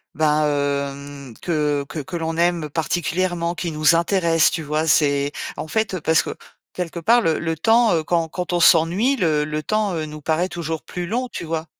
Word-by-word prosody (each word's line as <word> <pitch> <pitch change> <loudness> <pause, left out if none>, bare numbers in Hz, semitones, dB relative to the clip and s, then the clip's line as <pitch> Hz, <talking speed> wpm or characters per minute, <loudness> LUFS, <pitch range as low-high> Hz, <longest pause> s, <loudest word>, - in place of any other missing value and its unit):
bah, 155 0 +2
hem, 140 -2 -3
que 150 -4 0
que 160 - -5
que 175 +5 -7
l'on 165 -1 -2
aime 170 -2 +1
particulièrement, 170 +2 -1
qui 170 -1 -3
nous 155 +1 +3
intéresse, 170 -1 +3
tu - - -3
vois? 155 +1 -1
C'est 145 -2 +2 0.3
en - - -5
fait, 215 +2 -1
heu, 180 - -5
parce 160 +2 +3
que - - -6 0.4
quelque 175 -1 -4
part 235 +9 +4
le 160 -7 +1
le 165 -1 -2
temps, 225 +6 +4
heu, 160 - 0
quand 165 0 0
quand 180 +2 -4
on 175 - +2
s'ennuie, 175 +11 +4
le 160 - +1
le 155 0 -3
temps, 215 0 0
heu, 155 -1 -2
nous 155 0 -9
paraît 160 +5 0
toujours 165 -3 -4
plus 180 -1 -5
long, 245 +6 -1
tu - - -6
vois? 160 -1 -3
165 Hz, 205 wpm, -21 LUFS, 150-175 Hz, 0.4 s, part